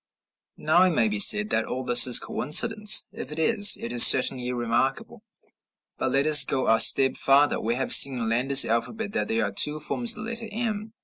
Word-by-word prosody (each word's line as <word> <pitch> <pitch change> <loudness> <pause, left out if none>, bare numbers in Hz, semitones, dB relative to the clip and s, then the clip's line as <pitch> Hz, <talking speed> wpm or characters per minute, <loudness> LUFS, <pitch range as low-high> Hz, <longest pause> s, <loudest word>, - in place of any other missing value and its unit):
Now 160 +3 -1
it 185 - +1
may 115 -4 -1
be 105 -1 -6
said 105 +1 +3
that 110 0 -3
all 130 +1 -8
this 120 0 +3
is 125 - +4
coincidence. 215 - 0
If 135 - -12
it 150 - -11
is, 205 +4 +3
it 115 - -9
is 120 -1 +2
certainly 125 -1 +1
remarkable. 120 +2 -6 0.8
But - - -4
let 135 +1 -2
us 155 -1 +6
go 130 -1 -5
a 115 0 0
step 130 +3 +3
farther: 140 +2 0
We 115 +2 -5
have 130 - -1
seen 135 -2 +5
in 115 -2 -6
Landa's 130 +4 +1
alphabet 200 - -6
that 105 - -6
there 115 0 -4
are 100 - -7
two 150 +9 -2
forms 235 +9 0
of 215 - -8
the 220 - -9
letter 230 -1 -6
m. 220 -1 -7
135 Hz, 210 wpm, -21 LUFS, -, 0.8 s, us